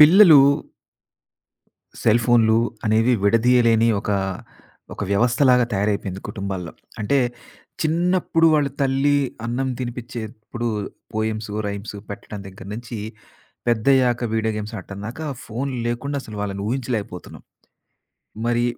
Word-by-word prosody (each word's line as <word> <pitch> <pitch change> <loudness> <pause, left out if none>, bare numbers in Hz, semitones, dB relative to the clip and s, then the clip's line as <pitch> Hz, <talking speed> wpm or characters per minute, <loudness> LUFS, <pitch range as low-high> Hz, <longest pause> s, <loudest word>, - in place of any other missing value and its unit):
పిల్లలు 160 -1 +9 1.6
సెల్ 115 +1 +4
ఫోన్లు 115 -2 +4 0.3
అనేవి 110 +3 +3
విడదీయలేని 115 +1 +4
ఒక, 105 - -4 0.8
ఒక - - -6
వ్యవస్థలాగా 125 +4 +4
తయారైపోయింది 100 -1 -1
కుటుంబాల్లో. 95 -4 -5 0.3
అంటే, 120 +7 +2 0.6
చిన్నప్పుడు 165 +1 +2
వాళ్ళ 145 -2 +2
తల్లి 140 +2 +2 0.3
అన్నం 130 +3 -1
తినిపించేప్పుడు 120 -1 -5 0.5
పోయిమ్సు, 110 -1 -2
రైమ్సు 100 +1 -6
పెట్టడం 100 0 -7
దగ్గర 95 0 -11
నుంచి 115 0 -6 0.7
పెద్దయ్యాక 120 +1 +3
వీడియో 110 0 0
గేమ్స్ 105 +2 -5
ఆడటం 95 +1 -9
దాకా 125 +8 -6 0.2
ఫోన్ 125 +5 -3 0.2
లేకుండా 130 +5 -2
అసలు 110 -4 -9
వాళ్ళని 100 -1 -3
ఊహించలేకపోతున్నాం. 115 -7 -4 1.0
మరి 120 0 +1
115 Hz, 100 wpm, -22 LUFS, 105-130 Hz, 1.6 s, పిల్లలు